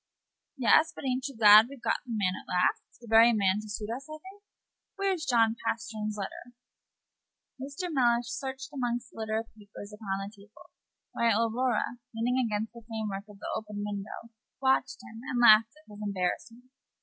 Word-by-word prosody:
"Yes; 290 +6 +4
but - - -9
a'n't 255 +1 -1
you 275 -4 -10
glad 215 0 +8
we've 275 -1 -11
got - - +1
the - - -6
man 200 -5 0
at - - -11
last 180 0 +2 0.2
the 240 - -14
very 225 +2 +6
man 200 -1 +2
to 215 - -11
suit 210 +1 -5
us, 275 +4 -10
I 310 - -7
think? 380 +5 -14 0.5
Where's 385 -5 -1
John 225 -2 +3
Pastern's 215 -2 -3
letter?" 240 +4 -7 1.0
Mr. 300 +6 -5
Mellish 240 -3 +3
searched 265 +3 -6
among 245 -3 -1
the 245 - -11
litter 220 0 -1
of 225 +1 -6
papers 205 -1 -12
upon 205 -2 -4
the 195 +2 -6
table, 205 +2 -18 0.4
while 230 -1 +2
Aurora, 240 0 -1 0.2
leaning 250 +3 +1
against 220 0 -2
the 235 - -11
frame 220 -1 -5
work 195 +1 -5
of 205 - -13
the - - -6
open 210 -1 -5
window, 205 +3 -7 0.3
watched 265 -1 +1
him, 230 -2 -11
and 250 -1 -3
laughed 225 -1 +7
at 310 - -22
his 205 0 -11
embarrassment. 210 +5 -3
230 Hz, 185 wpm, -29 LUFS, 210-255 Hz, 1.0 s, glad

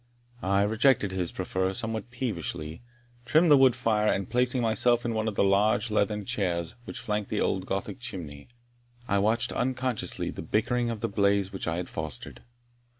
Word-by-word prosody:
I 100 +1 +2
rejected 110 -1 +3
his 90 -2 -2
proffer 95 0 -1
somewhat 115 -1 -4
peevishly, 85 - -4 0.4
trimmed 155 +7 +4
the - - +10
wood 130 -3 +5
fire, 110 -4 +2
and 95 -1 -1
placing 125 +1 +1
myself 120 +1 +2
in 115 - 0
one 110 0 -1
of 110 - -2
the - - +3
large 105 +3 +3
leathern 105 -1 0
chairs 85 -5 -1
which - - -7
flanked 105 -1 -2
the 105 - -1
old 95 -1 0
Gothic 95 +7 -3
chimney, 80 - -7 0.6
I 100 -4 +2
watched 110 +3 +1
unconsciously 130 -2 -1
the - - -7
bickering 120 +2 0
of 115 -2 -4
the - - 0
blaze 100 -1 +1
which 95 - -4
I 80 0 -1
had 90 - -3
fostered. 80 -6 -6
105 Hz, 175 wpm, -28 LUFS, 95-120 Hz, 0.6 s, the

